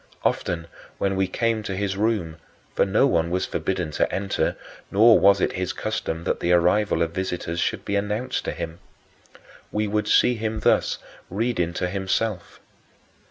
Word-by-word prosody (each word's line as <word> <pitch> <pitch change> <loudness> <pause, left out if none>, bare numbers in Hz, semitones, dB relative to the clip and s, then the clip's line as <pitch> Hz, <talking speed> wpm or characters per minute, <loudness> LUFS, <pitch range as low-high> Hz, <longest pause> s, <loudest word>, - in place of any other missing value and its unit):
Often 85 -2 -1 0.3
when 95 -1 0
we 95 0 +1
came 115 +3 0
to 100 -2 -4
his 100 0 -1
room 100 -6 -1 0.4
for - - +2
no 105 +7 +3
one 85 -11 +2
was 90 +1 0
forbidden 90 -4 -2
to - - 0
enter, 95 0 -1 0.3
nor 110 +3 +6
was 100 0 +5
it - - +1
his 95 0 -2
custom 80 +1 -3
that - - -1
the 85 - 0
arrival 90 0 +3
of 85 - -2
visitors 85 -2 -3
should - - -1
be 100 - -1
announced 105 +5 -1
to - - -1
him 80 0 -6 0.9
we 105 0 0
would 105 0 -1
see 125 - +5
him 110 -1 -3
thus - - +2 0.3
reading 100 -4 0
to 90 - -1
himself. 95 +1 -2
95 Hz, 165 wpm, -24 LUFS, 90-105 Hz, 0.9 s, nor